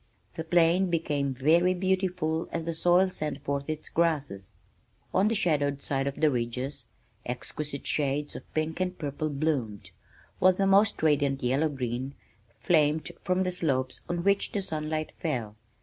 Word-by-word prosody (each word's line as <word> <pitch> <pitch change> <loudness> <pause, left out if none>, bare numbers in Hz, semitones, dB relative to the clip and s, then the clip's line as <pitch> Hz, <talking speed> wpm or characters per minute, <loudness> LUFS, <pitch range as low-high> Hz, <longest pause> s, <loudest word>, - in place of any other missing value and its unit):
The 160 - -4
plain 175 +2 +3
became 145 -5 0
very 165 +8 +3
beautiful 180 -3 0
as 165 -1 -3
the 165 - -2
soil 175 +3 +3
sent 150 -4 -4
forth 140 +1 -2
its 155 0 -3
grasses. 145 - -1 0.6
On 190 +3 +4
the 225 - +1
shadowed 145 -8 +1
sides 135 -1 -1
of 140 - -8
the 155 -2 +3
ridges 125 +2 -3 0.4
exquisite 140 +3 -5
shades 145 0 0
of - - -10
pink 155 +2 -1
and 185 0 -1
purple 155 0 -3
bloomed, 140 -8 -2 0.5
while 185 0 +6
the 195 +2 0
most 200 -1 +4
radiant 140 -3 +2
yellow 135 +6 +2
green 130 0 -4 0.5
flamed 155 -1 +2
from 185 +1 +1
slopes 135 -7 -1
on 175 -1 -1
which 200 +1 +2
the 200 - -1
sunlight 155 -2 -3
fell. 120 -10 -2
155 Hz, 150 wpm, -28 LUFS, 140-175 Hz, 0.6 s, while